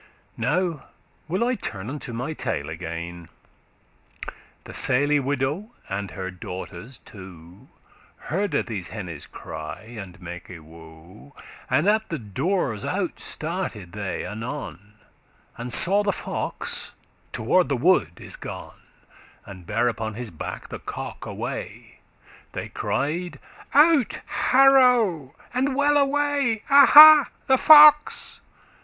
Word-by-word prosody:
Now 160 +5 -1 0.4
will 185 +7 -1
I 250 +1 +1
turn 105 - -5
unto 135 -1 -6
my 125 +7 -4
tale 70 - -4
again; 85 +1 -7 1.3
The - - -11
sely* 145 +3 +2
widow, 145 - -2 0.2
and 100 0 -4
her 95 +2 -6
daughters 95 +7 -9
two, 105 - -15
*simple, 90 -1 -14 0.6
honest 190 +1 -1
Hearde - - 0
these 100 -7 -5
hennes 90 -9 -7
cry 80 +4 -8 0.2
and 95 -1 -10
make 90 -1 -9
woe, 85 - -14 0.3
And 165 - +1
at 220 +1 +1
the 165 - -3
doors 125 - -2
out 185 -2 -3
started 155 - -4
they 100 -1 -5
anon, 110 - -7 0.6
And 120 +1 -7
saw 195 +10 +4
the 205 -1 0
fox - - -3 0.4
toward 160 +11 +1
the 140 - 0
wood 120 - +2
is - - -7
gone, - - -9 0.6
And 95 -3 -12
bare 115 +4 0
upon 110 -2 -3
his 120 -1 -6
back 80 - -8
the - - -7
cock - - -7
away: - - -7 0.5
They - - -6
cried, 170 +5 -3 0.4
"Out! 295 -4 +4
harow! 245 - +3 0.2
and 260 +2 0
well 290 +1 +2
away! 280 -5 0
Aha! 295 +1 +9 0.2
the 265 -1 +3
fox!" 300 -1 +6
135 Hz, 125 wpm, -23 LUFS, -, 1.3 s, Aha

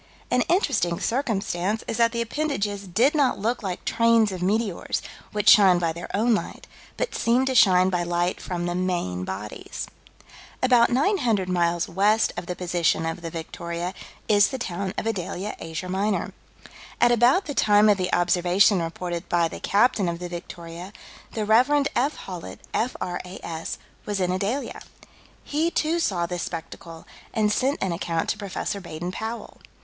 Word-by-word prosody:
An 250 - +3
interesting 245 - +1
circumstance 215 -5 -1
is 225 - -2
that 230 -1 +4
the 235 0 -1
appendages 215 -7 -2
did 235 - +3
not 285 -4 +2
look 230 +5 -1
like 185 -4 -5
trains 230 -2 +3
of 185 -2 -5
meteors, 205 0 0 0.3
which 210 0 -2
shine 190 -4 +8
by 165 -2 0
their 170 +2 -8
own 230 +4 +3
light, 215 - -3 0.3
but - - -2
"seemed 245 +3 +2
to 265 - 0
shine 185 -5 +5
by 180 -1 0
light 175 +1 -1
from 175 -1 -3
the 175 - -1
main 175 - -1
bodies." 100 +3 -6 0.8
About 245 -2 +5
900 245 - +1
miles 175 -1 +1
west 205 +5 +2
of 170 - -6
the 180 - -3
position 175 -2 0
of 165 +2 -3
the 165 - -5
Victoria 170 +2 -5 0.3
is 205 -1 +5
the 265 - -4
town 190 -4 -3
of - - -2
Adalia, 195 -1 -3
Asia 165 +2 -5
Minor. 195 +2 -1 0.7
At 240 - +5
about 245 - +4
the 290 - -4
time 210 -3 +4
of 205 -2 +4
the 180 -1 -1
observation 180 +2 +3
reported 170 +1 -4
by 170 -1 +3
the - - -8
captain 205 -3 +2
of 170 - -3
the 175 0 -6
Victoria, 175 +1 -8 0.4
the 215 -2 -2
Rev. 255 +7 +4
F. 280 +5 +1
Hawlett, 170 - -8
F.R.A.S., 180 -7 -4 0.3
was 205 -1 -1
in 180 -1 +1
Adalia. 200 +9 -2 0.6
He, 310 +3 0
too, 330 0 0
saw 185 - 0
this 175 0 -4
spectacle, 165 0 -7 0.3
and 215 -2 +2
sent 265 +6 +1
an 190 - 0
account 165 -1 -2
to 210 - -1
Prof. 200 0 -3
Baden 175 0 -5
Powell. 225 +4 -6
190 Hz, 165 wpm, -25 LUFS, 175-230 Hz, 0.8 s, shine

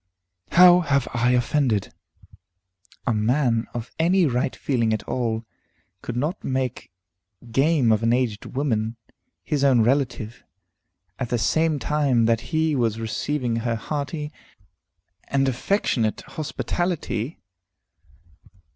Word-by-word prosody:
"How 180 0 +8
have 140 -6 +1
I 120 0 +2
offended?" 125 -4 +1 1.1
"A 120 - +1
man 115 +1 +1
of 120 0 -6
any 180 +2 +4
right 125 -2 0
feeling 115 -5 0
at 110 - -2
all 115 -2 -2 0.6
could 120 - -5
not 150 +9 -2
make 130 -2 -3 0.6
game 135 -1 +3
of 110 -1 +2
an 115 0 +2
aged 120 -4 0
woman, 115 -5 -1 0.5
his 145 -2 -1
own 130 -4 +5
relative, 120 -2 0 0.8
at 125 -3 -3
the 120 - +1
same 160 +6 +1
time 140 -6 +1
that 115 0 +2
he 160 -2 +1
was 115 -4 0
receiving 120 +1 -2
her 115 0 -1
hearty 150 +5 -4 1.0
and 135 -1 +1
affectionate 125 - 0
hospitality." 160 - -3
125 Hz, 115 wpm, -24 LUFS, 115-150 Hz, 1.1 s, How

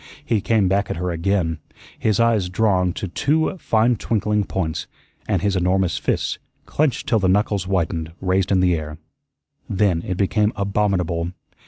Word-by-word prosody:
He 110 -3 +1
came 110 -2 +2
back 100 +1 +1
at - - -2
her 90 +1 -2
again, 85 -1 0 0.4
his 110 -1 +1
eyes 115 -6 +2
drawn 90 -2 +2
to 100 - -4
two 155 - 0
fine 115 -1 +2
twinkling 105 -1 0
points, 85 -4 -3 0.4
and - - 0
his 100 -1 +1
enormous 90 -2 +1
fists, - - -1 0.3
clenched 150 -5 0
till 115 - +3
the 95 -2 +1
knuckles 100 0 +1
whitened, 85 -3 -1
raised 95 +1 0
in 95 -1 +4
the 90 -1 +3
air. 75 -2 -4 0.7
Then 95 -5 +1
it 90 +1 -4
became 105 +2 +1
abominable. 95 -4 0
95 Hz, 160 wpm, -21 LUFS, 90-105 Hz, 0.7 s, in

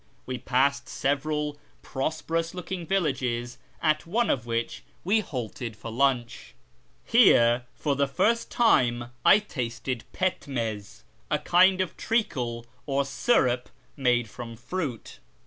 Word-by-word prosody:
We 125 -1 -4
passed 135 0 +1
several 150 +1 -1 0.2
prosperous 165 +4 -2
looking 180 -1 -5
villages, 125 -9 -1 0.2
at 155 +1 +1
one 230 +7 +1
of 120 -2 -2
which 115 0 -2 0.2
we 205 +5 +3
halted 120 - -5
for 110 +2 -8
lunch. 120 - -1 0.5
Here 120 - +5
for 145 -2 -1
the 140 0 +1
first 230 +12 +1
time 120 - +2
I - - +8
tasted 125 - -4
pdmcz, 115 - -3 0.3
a - - +2
kind 185 +2 +4
of 185 - -3
treacle 125 - -1 0.2
or 140 0 +1
syrup 125 - +1 0.3
made 120 -3 +2
from 115 +2 -8
fruit. 130 0 -5
135 Hz, 120 wpm, -27 LUFS, 120-165 Hz, 0.5 s, I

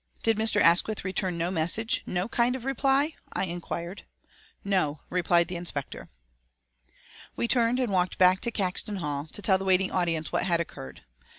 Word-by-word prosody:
"Did 225 0 +3
Mr. 220 -1 +3
Asquith 195 +5 +3
return 185 -1 -2
no 170 +2 -1
message, 185 +7 0
no 180 +2 -1
kind 240 +1 +1
of 255 -2 -7
reply?" 270 +3 +1 0.2
I - - 0
inquired. 175 +1 -6 0.6
"No," 180 -7 0
replied 175 -1 +2
the 180 -1 -5
inspector. 170 -5 -5 1.3
We 235 - -1
turned 235 +1 +2
and 250 -5 -1
walked 180 -1 0
back 185 0 +5
to 235 - -1
Caxton 200 0 -1
Hall, 150 -4 -4
to 205 - -6
tell 190 -1 +3
the 195 - -5
waiting 190 0 +3
audience 165 -3 -1
what - - 0
had 170 -3 +1
occurred. 65 - -7
185 Hz, 170 wpm, -27 LUFS, 170-220 Hz, 1.3 s, back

